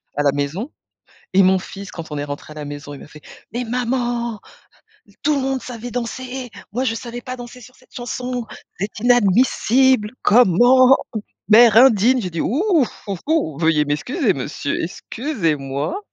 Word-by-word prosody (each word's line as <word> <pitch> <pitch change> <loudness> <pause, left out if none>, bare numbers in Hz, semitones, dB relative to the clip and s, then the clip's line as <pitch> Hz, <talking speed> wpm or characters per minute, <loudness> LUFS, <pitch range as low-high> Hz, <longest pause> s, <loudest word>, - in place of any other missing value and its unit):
à 145 - 0
la 140 - +4
maison 145 - -3 0.6
et 195 - +6
mon 190 0 +4
fils 195 +1 -9
quand 165 -2 -9
on - - -3
est 145 - -2
rentré 145 +1 -7
à - - -12
la 150 -1 -6
maison 145 0 -8
il 140 - -11
m'a - - -11
fait: 150 0 -15 0.3
«Mais 245 +2 -3
maman! 240 -2 -2 0.8
Tout 300 +1 +2
le - - 0
monde 265 0 -1
savait 245 -1 -7
danser! 250 +1 -5 0.2
Moi 250 +4 -1
je 225 - 0
savais 240 0 -7
pas 255 +1 -6
danser 245 0 -10
sur 255 +3 -15
cette 255 - -25
chanson, 245 0 -4 0.3
c'est 200 +3 -2
inadmissible! 245 +1 +3
Comment? 245 +5 +6 0.5
Mère 220 0 +7
indigne!», 250 0 +5
j'ai 180 - -4
dit: 165 -1 -4
«Hou 275 - 0 0.5
hou 195 - -2
hou, 290 - 0
veuillez 160 -2 +2
m'excuser 205 - 0
monsieur, 140 +1 -3
excusez-moi». 165 - -3
230 Hz, 165 wpm, -20 LUFS, 165-250 Hz, 0.8 s, Mère